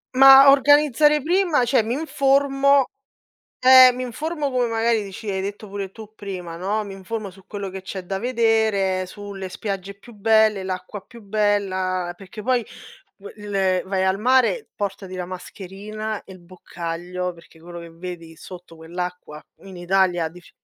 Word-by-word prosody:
Mah, 270 +1 +9
organizzare 290 +1 +4
prima 340 -5 +2
cioè 245 -1 +3
mi 225 +2 -3
informo 275 -2 +2 0.7
eh, 255 0 +8
mi 255 - -5
informo 295 +4 -3
come 250 -2 +1
magari 225 -1 +1
dici 200 +2 -7
hai 190 -1 -2
detto 205 +2 -6
pure 195 -1 -5
tu 215 +1 -12
prima, 180 -5 -7
no, 205 +4 -2
mi 200 - -8
informo 200 +2 -6
su 190 0 -19
quello 200 -2 -6
che 190 +1 -7
c'è 190 0 -7
da 195 +2 -3
vedere, 220 -5 +1
sulle 200 -1 -8
spiagge 195 0 -5
più 200 +4 -16
belle, 220 -1 +3
l'acqua 185 +2 -6
più 235 +3 -16
bella. 195 -3 -1
Perché 195 +3 -11
poi 250 +1 +1 0.7
il 195 -3 -1
vai 190 0 0
al 190 +1 +1
mare, 260 - +2
portati 195 -2 -5
la 180 -1 -4
mascherina 200 +4 -7
e 190 - -12
il 185 - -15
boccaglio, 175 0 -6
perché 170 -1 -19
quello 175 +1 -10
che 170 - -10
vedi 165 -1 -9
sotto 180 0 -12
quell'acqua 170 -1 -7 0.2
in 190 -1 -11
Italia 175 -2 +1
diff 175 +2 -16
200 Hz, 155 wpm, -22 LUFS, 185-235 Hz, 0.7 s, Mah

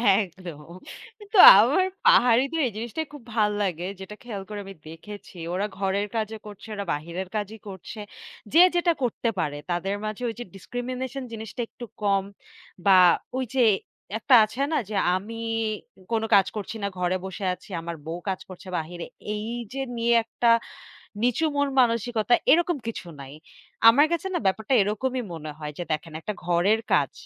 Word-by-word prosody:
একদম। 180 -6 -4 0.6
কিন্তু 415 0 -4 0.2
আমার 275 - +4 0.2
পাহাড়িদের 255 +7 +4
এই - - -5
জিনিসটাই 240 +8 -4
খুব 290 -5 -11
ভাল 210 -2 +3
লাগে, 180 -3 -2
যেটা 195 +2 -8
খেয়াল 220 -5 -6
করে 210 -1 -5
আমি 195 - -9
দেখেছি। 200 +6 -11 0.2
ওরা 190 +3 0
ঘরের 200 +1 0
কাজও 220 0 -2
করছে 205 +1 -11
ওরা 200 -1 -4
বাহিরের 170 +5 -5
কাজই 210 +1 -3
করছে। 195 +3 -9 0.5
যে 325 - +6 0.2
যেটা 345 0 +3
করতে 235 -1 0
পারে 145 -3 -1
তাদের 185 +3 -1
মাঝে 215 +2 -5
ওই - - -4
যে 240 - -5
ডিসক্রিমিনেশন 250 +5 -5
জিনিসটা 220 +2 -6
একটু 240 - -9 0.2
কম। 200 -2 +2 0.6
বা 195 - +7 0.4
ওইযে 260 0 -1 0.6
একটা 255 +3 +5
আছে 230 +5 -6
না 315 - +2
যে 215 - -4 0.2
আমি 205 +5 -5 0.8
কোনো 225 -1 +1
কাজ 195 -1 +5
করছি 210 +1 -5
না, - - +1
ঘরে 180 0 0
বসে 190 +1 -5
আছি। 180 - -13
আমার 170 0 -5
বউ 165 +2 -4
কাজ 190 - -2
করছে 185 +1 -11
বাহিরে। 170 +2 -5 0.3
এই 210 +1 -4 0.3
যে 270 - -4 0.2
নিয়ে 235 +1 +2
একটা 230 +1 -2 0.8
নিচু 245 +6 +2
মন-মানসিকতা 240 -5 +2 0.2
এরকম 345 +1 +4
কিছু 230 -5 -5
নাই। 135 0 -9 0.6
আমার 280 +7 +7
কাছে 340 +2 -1
না - - +2
ব্যাপারটা 220 +6 +1
এরকমই 245 +6 -1
মনে 155 -1 -7
হয় 150 -1 -6
যে, - - -3
দেখেন 155 +1 -3
একটা 210 - -4
ঘরের 175 +6 +2
কাজ। 140 -6 +2
210 Hz, 165 wpm, -25 LUFS, 185-245 Hz, 0.8 s, বা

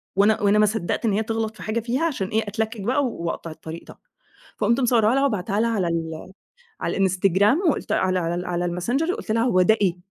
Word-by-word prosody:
وأنا 205 +2 +3
وأنا 205 +1 +3
ما 210 - +6
صدقت 210 0 -2
إن 220 - +2
هي 220 +2 +1
تغلط 225 -1 -3
في - - -10
حاجة 220 +2 -1
فيها 245 +7 -2
عشان 255 - -2
إيه 220 +3 0
أتلكك 220 +1 -3
بقى 260 +6 +1
وأقطع 170 -6 -4
الطريق 160 +1 -9
ده. - - -13 0.6
فقُمت 225 +4 +2
مصوّراها 235 -2 +3
لها 275 +1 +3
وباعتاها 205 -4 -1
لها 230 - +1
على 195 -6 0
ال 165 +1 -4 0.5
على - - -2
الإنستجرام، 195 - +3
وقُلت - - -2
على 185 -1 +1
على 175 +1 -3
على 175 0 -1
الmessenger 240 - -1
وقُلت 375 - -5
لها: 230 +1 +2
"هو 210 -7 +3
ده 220 +5 +4
إيه؟!" 185 -4 +2
210 Hz, 215 wpm, -23 LUFS, 185-230 Hz, 0.6 s, ما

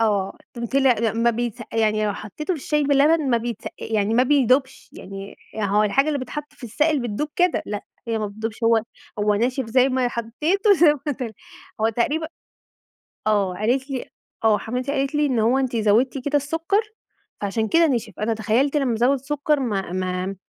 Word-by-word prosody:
آه، 205 -3 +1 0.2
ط 240 - -9
طلع 270 -2 +4
ما 230 -2 +1
ما 230 +1 +2
بيتس 235 0 -3
يعني 215 -1 +1
لو 205 - 0
حطيته 300 - -4
في 305 - -7
الشاي 300 +1 0
باللبن 285 +1 +3
ما 235 - +4
بيتسقا 235 -1 -5
يعني 215 0 0
ما 245 - +5
بيدوبش، 260 -1 +2
يعني 195 +1 -9 0.2
هو 210 0 +2
الحاجة 270 +8 +2
اللي 295 -2 0
بيتحط 295 +3 -6
في - - -12
السائل 295 +6 +1
بتدوب 240 +6 -2
كده، 360 -1 +2
لأ 205 -1 -4 0.3
هي 225 -1 0
ما 215 - -2
بتدوبش 220 +2 -5
هو 230 -1 +4 0.4
هو 210 0 +2
ناشف 250 +3 0
زي 255 +3 +3
ما 255 -1 +1
حطيته 305 - +1
زي 315 -3 +5
ما 295 - +1
طلع 250 -4 -5 0.5
هو 220 - +3
تقريبًا 290 +8 0 1.0
آه 200 -4 +2
قالت 250 +8 0
لي 260 -2 -4 0.4
آه 215 -2 +5
حماتي 250 +4 -3
قالت 275 0 -1
لي 295 0 +2
إن 255 -5 0
هو 235 +4 +3
أنتِ 260 -3 -1
زودتِ 225 +5 +2
كده 290 0 +1
السكر 325 +8 0 0.6
فعشان 215 +2 -1
كده 330 +8 +5
ِنِشف، 235 -7 -1
أنا 225 +1 0
تخيلت 235 +7 +1
لما 265 -5 +1
أزوّد 250 +5 +2
سكر 290 +2 0
ما 200 -8 -2
ما 185 +1 -2
240 Hz, 185 wpm, -23 LUFS, 215-280 Hz, 1.0 s, ما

